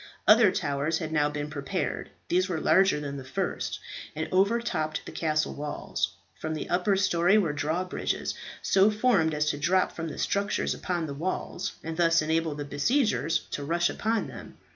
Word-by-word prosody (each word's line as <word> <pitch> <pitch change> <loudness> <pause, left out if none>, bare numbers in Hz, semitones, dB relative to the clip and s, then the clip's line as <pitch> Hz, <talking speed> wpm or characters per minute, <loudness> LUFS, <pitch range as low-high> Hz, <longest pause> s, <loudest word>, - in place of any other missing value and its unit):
Other 215 -2 +7
towers 145 -1 -1
had 160 -2 -4
now 150 -2 +2
been 145 0 -4
prepared. 155 +6 -3 0.2
These 185 +2 +2
were 170 -3 -1
larger 190 -1 +4
than 140 -1 -5
the 135 - -7
first, 130 0 -3 0.4
and 160 +1 -2
overtopped 190 -6 +1
the - - -7
castle 155 -1 0
walls. 145 0 -3 0.2
From 155 0 -3
the 155 - -5
upper 185 +3 +2
story 185 0 +3
were 170 -8 +2
drawbridges, 160 +5 -2 0.3
so 195 +2 +5
formed 210 -8 +2
as 150 0 +1
to 145 - -6
drop 185 +5 +2
from 165 0 -5
the 155 - -6
structures 200 +1 0
upon 175 -2 -2
the 145 - -5
walls, 165 +7 -3
and 160 0 -5
thus 165 -2 +4
enable 160 -1 0
the 145 0 -5
besiegers 165 - +1
to 145 - -3
rush 170 +4 +1
upon 225 0 0
them. - - -10
165 Hz, 175 wpm, -28 LUFS, 150-190 Hz, 0.4 s, Other